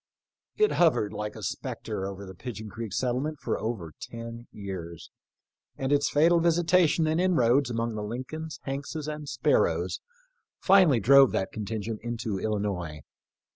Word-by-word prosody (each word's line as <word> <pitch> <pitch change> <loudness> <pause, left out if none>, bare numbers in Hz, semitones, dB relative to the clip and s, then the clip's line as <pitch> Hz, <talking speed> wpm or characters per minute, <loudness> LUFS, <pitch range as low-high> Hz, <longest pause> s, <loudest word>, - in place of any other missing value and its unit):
It 425 0 +4
hovered 150 - +3
like 105 0 -4
a - - -9
spectre 95 - -4
over 100 0 -7
the 95 - -9
Pig 115 +5 -7
eon 110 -1 -7
creek 115 -2 -6
settlement 130 +7 -1
for - - -2
over 105 -9 -4
ten 115 0 -8
years, 90 -5 -7 0.7
and 135 +1 -2
its 145 0 +3
fatal 165 +3 +4
visitation 170 0 +3
and 160 +2 +1
inroads 140 -7 +3
among 115 -1 -1
the 105 - -4
Lincolns, 130 +9 -5
Hankses, 140 +3 -4
and 150 -1 -5
Sparrows 95 - +1 0.6
finally 185 -10 +5
drove 135 +5 +6
that 95 - -1
contin 110 0 -4
gent 110 0 -4
into 115 -4 -3
Illinois. 100 -8 -2
120 Hz, 150 wpm, -28 LUFS, 105-150 Hz, 0.7 s, drove